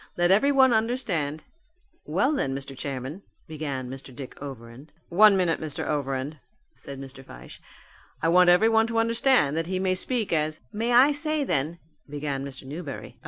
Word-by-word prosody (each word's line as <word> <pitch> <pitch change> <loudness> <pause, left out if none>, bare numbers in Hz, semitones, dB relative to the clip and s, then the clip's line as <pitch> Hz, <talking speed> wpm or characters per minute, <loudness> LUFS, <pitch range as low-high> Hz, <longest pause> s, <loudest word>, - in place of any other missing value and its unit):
Let 175 +1 +3
everyone 265 +4 +5
understand 200 - -1 0.3
" - - -46 0.3
"Well - - +1
then, 135 - -1
Mr. 135 0 -7
Chairman," 135 +5 -5 0.3
began 145 -5 -4
Mr. 135 +1 -9
Dick 130 0 -8
Overend. 135 +1 -10 0.2
"One 200 +3 +6
minute, 175 -3 +1
Mr. 155 -2 -5
Overend," 140 0 -2 0.3
said 140 -2 -9
Mr. 135 0 -10
Fyshe. 60 - -13 0.6
"I 165 - 0
want 180 +1 +5
everyone 220 +5 +4
to 230 0 -3
understand 230 - +3
that 165 0 -1
he 185 +1 -2
may 185 0 +1
speak 215 +1 -1
as 155 0 0
" - - -40
"May 235 +1 0
I 255 +4 +6
say 300 +1 -1
then 155 - -1 0.2
" 150 - -35
began 145 -2 -3
Mr. 140 -1 -8
Newberry. 155 +6 -8
160 Hz, 170 wpm, -26 LUFS, 140-220 Hz, 0.6 s, One